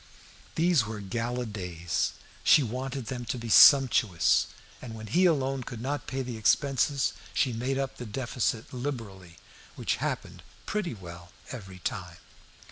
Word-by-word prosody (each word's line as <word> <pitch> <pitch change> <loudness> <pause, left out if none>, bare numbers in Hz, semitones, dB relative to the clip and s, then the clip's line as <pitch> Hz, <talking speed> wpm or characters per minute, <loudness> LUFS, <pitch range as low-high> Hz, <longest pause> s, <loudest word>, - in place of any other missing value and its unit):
These 165 -8 +3
were 110 - -5
her 105 - -7
gala 120 +4 -2
days. 90 -6 -2 0.3
She 150 - +6
wanted 130 +2 -4
them 125 0 -4
to 125 - -3
be 115 -1 -6
sumptuous, 120 - +6 0.3
and 115 -3 -8
when 110 0 -8
he 175 - +3
alone 135 -5 +2
could 120 -2 -7
not 140 +3 -3
pay 135 +1 -2
the 120 -2 -5
expenses, 135 +4 +2 0.2
she 125 - +2
made 125 +4 -1
up 135 -1 -3
the 120 - -7
deficit 115 0 -2
liberally, 110 -10 -6 0.4
which - - -1
happened - - -4 0.2
pretty 190 - -2
well 85 -3 -11 0.2
every 95 -6 -8
time. 90 -1 -5
120 Hz, 150 wpm, -28 LUFS, 105-135 Hz, 0.4 s, She